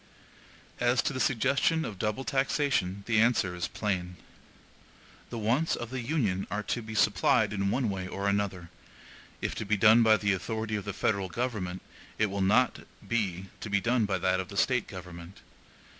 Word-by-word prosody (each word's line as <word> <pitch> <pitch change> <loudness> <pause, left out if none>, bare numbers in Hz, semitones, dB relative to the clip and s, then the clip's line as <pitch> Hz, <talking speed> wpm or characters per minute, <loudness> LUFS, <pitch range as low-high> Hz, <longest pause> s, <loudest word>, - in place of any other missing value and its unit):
As 120 0 +2
to - - -1
the 130 - -3
suggestion 135 +6 +2
of 100 -4 -7
double 105 +4 -1
taxation, 135 -8 0
the 115 -2 +2
answer 115 -6 +2
is 90 -1 -3
plain. 90 -4 -3 1.1
The 120 - -5
wants 120 +9 +1
of 120 0 -6
the 130 - -3
Union 115 - -1
are 105 +3 -2
to 120 - -2
be 110 0 -8
supplied 105 +2 +3
in 100 -1 0
one 125 +3 0
way 95 -2 -3
or 100 +2 -3
another; 100 -4 -1 0.7
if - - -2
to - - -4
be 105 0 0
done 110 +3 +6
by 110 -1 +5
the 100 -2 +1
authority 110 +3 -3
of 105 - -4
the 100 - -4
federal 100 -1 0
government, 100 -5 -3 0.3
it 105 -2 +1
will 100 0 -2
not 110 +6 +3 0.3
be 95 -6 -1
to - - -6
be 100 -1 +2
done 120 +1 +1
by - - 0
that 95 +1 +1
of 95 - -4
the 100 - -8
State 125 +1 +2
government. 90 -1 -10
105 Hz, 185 wpm, -29 LUFS, 95-120 Hz, 1.1 s, done